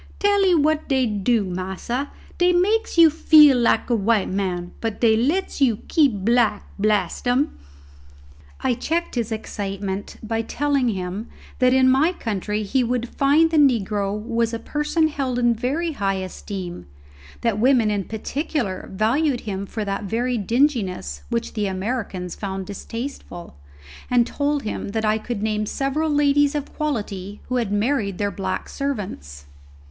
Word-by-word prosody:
Tell'ee 400 -3 +3
what 310 0 +1
dey 265 -2 +3
dew, 210 0 +1
massa, 190 +9 -3 0.3
dey 355 0 +4
makes 415 +4 +1
you 330 -2 +8
feel 300 -2 +7
like 235 -2 +2
a - - +4
white 215 -1 +1
man, 180 -2 -2
but 225 -2 -3
dey 225 -2 +4
lets 295 +9 0
you 240 -6 +4
keep 250 - +2
black, 235 -3 +2
blast 205 0 0
'em!" 260 +5 +2 1.1
I - - +1
checked 325 +8 -2
his 235 -3 -2
excitement 200 -2 -4
by 225 +1 -1
telling 280 +2 0
him 190 +2 -4 0.3
that 255 0 +4
in 260 0 +4
my 275 +7 +4
country 210 - -3
he 250 +5 +1
would 245 0 -1
find 300 +4 +3
that 320 - +2
the 245 -4 +1
negro 200 0 -2
was 230 +1 -1
a - - -2
person 300 +6 0
held 270 -5 -2
in 240 -1 +3
very 280 +9 -1
high 200 -8 -1
esteem, 185 - -6 0.5
that 230 - +2
the 205 - -5
women 245 -4 +4
in 200 -2 -1
particular 230 - -3
valued 245 +7 +1
him 200 -2 -4
for 215 0 -4
that 200 +1 -3
very 240 +5 -1
dinginess 205 - 0
which 115 - -2
the 210 -2 -1
Americans 190 -2 -3
found 190 -2 -5
distasteful, 205 - -7 0.5
and 245 -1 +4
told 290 +2 -1
him 210 - -4
that 220 -1 0
I 215 +1 +2
could 220 -2 -4
name 215 -1 -1
several 280 +6 -1
ladies 290 0 +3
of 290 -1 -4
quality 205 -9 -4
who 255 - 0
had 230 -5 -1
married 205 -2 0
their 205 -1 -1
black 190 -2 -3
servants. 185 - -5
230 Hz, 160 wpm, -22 LUFS, 200-280 Hz, 1.1 s, you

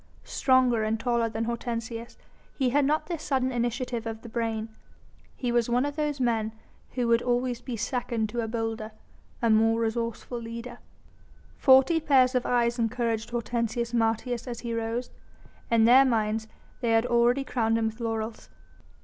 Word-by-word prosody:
Stronger 255 -4 +2
and 215 +1 0
taller 235 -1 +1
than 220 +1 -3
Hortensius, 230 0 -4 0.4
he 260 -3 +1
had 285 +1 +3
not 305 +3 +1
the 340 -3 -4
sudden 260 -3 0
initiative 240 -1 -2
of 225 0 -6
the 235 - -9
brain. 225 -1 -2 0.7
He 245 -2 -2
was 240 -1 +1
one 245 +3 +2
of 290 0 -3
those 295 -2 -1
men 225 -3 0 0.4
who 245 -2 0
would 230 0 +4
always 245 0 0
be 245 -1 -5
second 230 -1 -1
to 235 +2 -2
a 225 - -3
bolder, 225 -1 -3 0.5
a 230 - +4
more 225 +1 +4
resourceful 230 +1 -2
leader. 235 +1 -7 0.8
Forty 265 +5 +5
pairs 265 -4 +4
of 250 -1 0
eyes 240 0 +1
encouraged 230 -1 -1
Hortensius 235 0 -2
Martius 230 +2 0
as 240 -2 -5
he 235 -1 -4
rose. 230 +2 -3 0.6
In 230 -1 +4
their 255 +3 +8
minds 220 -3 0 0.3
they 235 -2 +1
had 225 +1 +3
already 240 +2 +3
crowned 225 -4 0
him 225 - 0
with 220 +1 -3
laurels. 225 -1 -4
235 Hz, 165 wpm, -27 LUFS, 225-250 Hz, 0.8 s, their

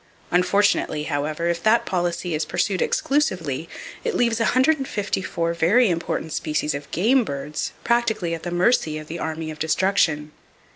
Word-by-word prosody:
Unfortunately, 180 -4 +2
however, 150 +3 -2
if 170 0 -1
that 220 +4 +3
policy 175 -1 -1
is 155 0 0
pursued 185 +4 -1
exclusively, 170 - 0 0.3
it 470 -3 -1
leaves 235 -2 +2
154 225 - 0
very 185 +7 +3
important 165 -1 -3
species 150 0 -1
of 145 0 -6
game 240 - +3
birds 150 -3 -4
practically 220 -7 +1
at 165 - -4
the 175 - -4
mercy 175 -3 +2
of 155 - -7
the 165 +2 -6
Army 160 0 -4
of 155 - -10
Destruction! 160 -2 +1
170 Hz, 145 wpm, -23 LUFS, 155-215 Hz, 0.3 s, that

